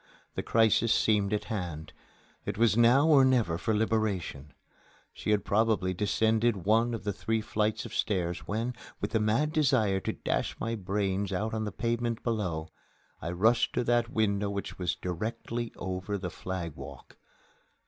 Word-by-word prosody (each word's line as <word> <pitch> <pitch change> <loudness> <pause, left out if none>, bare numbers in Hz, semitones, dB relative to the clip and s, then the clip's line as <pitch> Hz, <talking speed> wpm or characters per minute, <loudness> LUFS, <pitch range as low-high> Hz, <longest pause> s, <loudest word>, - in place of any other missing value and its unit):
The - - -2
crisis 115 0 +3
seemed 105 -2 +2
at 105 - 0
hand. 85 -8 -5 0.5
It - - -4
was 115 -2 +4
now 120 +6 +5
or 145 -4 +7
never 120 -11 +2
for 110 - -1
liberation. 105 -10 -1 0.6
She - - -5
had 105 -1 +2
probably 105 -3 +2
descended 110 +1 +1
one 115 +3 +3
of 115 - -7
three 110 0 -1
flights 110 -1 -1
of 115 - -8
stairs 90 -7 -1
when, 115 +4 -1 0.3
with - - -3
the 110 - +2
mad 115 +8 +1
desire 110 -11 +3
to - - -3
dash - - -2
my 115 - -2
brains 100 -1 -1
out 105 +4 -2
on 110 -1 -1
the 105 - -3
pavement 115 0 -2
below, 90 -9 -2 0.5
I 85 - -3
rushed 115 +7 +2
to - - 0
that 120 0 +2
window 105 -3 +1
which 100 -1 -5
was 90 -2 0
directly 115 +6 -4
over 95 +2 -3
the 90 -2 -5
flag 90 -4 -5
walk. 70 -1 -11
105 Hz, 160 wpm, -29 LUFS, 95-115 Hz, 0.6 s, or